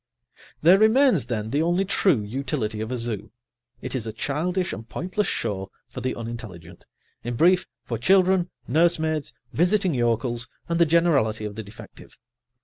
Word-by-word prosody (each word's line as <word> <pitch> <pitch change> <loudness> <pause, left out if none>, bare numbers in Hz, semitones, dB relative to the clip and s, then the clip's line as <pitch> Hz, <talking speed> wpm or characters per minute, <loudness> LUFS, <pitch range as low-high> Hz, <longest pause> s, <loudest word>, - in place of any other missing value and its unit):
There 180 +5 +7
remains, 220 - +4
then, 110 -2 -3
the 145 - +1
only 175 +4 +1
true 180 - +2
utility 110 -1 -3
of 110 +2 -4
a 125 - -1
zoo: 115 -3 -4 0.5
it - - -3
is 115 -4 -2
a - - -3
childish 170 - -2
and 110 +4 -8
pointless 185 +5 -2
show 95 -1 -2 0.2
for - - -7
the 130 - -2
unintelligent, 110 -8 -8 0.4
in 120 0 -3
brief, 180 +7 +3 0.2
for 115 -3 -4
children, 185 +4 +3 0.2
nursemaids, 160 -2 +1 0.2
visiting 180 +1 +2
yokels 120 -1 0 0.2
and 170 0 -1
the 170 - +5
generality 140 -10 +2
of 105 - -5
the 110 - -6
defective. 105 0 -13
140 Hz, 155 wpm, -24 LUFS, 115-175 Hz, 0.5 s, There